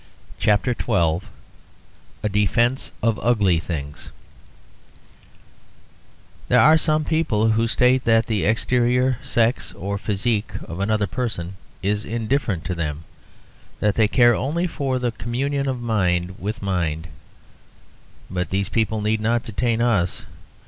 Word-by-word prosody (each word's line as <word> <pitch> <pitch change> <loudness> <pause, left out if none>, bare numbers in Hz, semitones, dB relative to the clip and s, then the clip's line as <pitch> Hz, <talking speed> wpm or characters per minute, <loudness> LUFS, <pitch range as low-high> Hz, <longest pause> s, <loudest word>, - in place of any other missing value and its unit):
A - - +1
DEFENCE 120 +6 +1
OF 115 -1 +1
UGLY 105 -8 +2
THINGS 75 -3 -6 2.4
There - - +4
are 155 - +7
some 155 -1 +2
people 130 -9 +1
who 115 +1 +2
state 125 +2 +3
that 115 0 +4
the 110 -4 -1
exterior, 125 +3 +2
sex, 120 -3 0
or 100 +1 -4
physique 105 +2 -1
of 85 +2 -7
another 105 +1 +1
person 100 -7 -3 0.3
is 105 +2 0
indifferent 115 - -1
to 90 - -2
them, 80 -2 -3 0.8
that 105 -1 +2
they 110 0 +3
care 120 +1 +5
only 155 +9 -1
for 140 -6 -2
the 125 -1 -1
communion 135 +5 -2
of 130 -2 -2
mind 90 -6 0
with 105 +2 -4
mind; 85 -4 -1 1.2
but 90 0 -3
these 100 +1 -1
people 110 -1 0
need 110 +1 0
not 115 +2 +1
detain 115 +2 0
us. 100 -8 0
110 Hz, 120 wpm, -22 LUFS, 100-125 Hz, 2.4 s, are